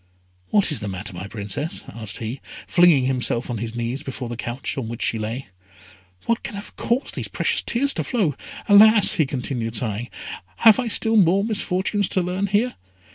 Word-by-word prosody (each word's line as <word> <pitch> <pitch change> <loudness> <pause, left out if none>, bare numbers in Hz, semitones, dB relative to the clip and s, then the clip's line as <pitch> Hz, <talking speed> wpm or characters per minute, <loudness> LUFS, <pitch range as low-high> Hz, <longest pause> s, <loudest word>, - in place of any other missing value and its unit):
"What 205 -5 +2
is 145 - 0
the 105 - -5
matter, 95 +1 -5
my 90 +3 -7
Princess?" 105 - -4
asked 110 -2 -5
he, 115 +4 -6 0.2
flinging 175 -7 +4
himself 125 -2 -1
on 115 - -3
his 115 +1 -5
knees 120 +3 -3
before 130 -4 -6
the 120 - -4
couch 120 +4 -4
on 130 -5 -4
which 115 0 -5
she 115 - 0
lay. 115 +3 -5 0.8
"What 230 0 0
can - - -6
have 200 +1 -9
caused 245 +4 -1
these - - -2
precious - - +1
tears 275 +4 +2
to - - -2
flow? 205 - 0 0.3
Alas!" 210 0 +7
he 155 - +1
continued, 125 -4 -3
sighing, 115 +1 -2 0.5
"have 225 - +6
I 250 - -1
still 225 0 +2
more 195 0 +4
misfortunes 205 -2 0
to 185 - 0
learn 185 +3 -2
here?" 215 +6 0
135 Hz, 185 wpm, -22 LUFS, -, 0.8 s, Alas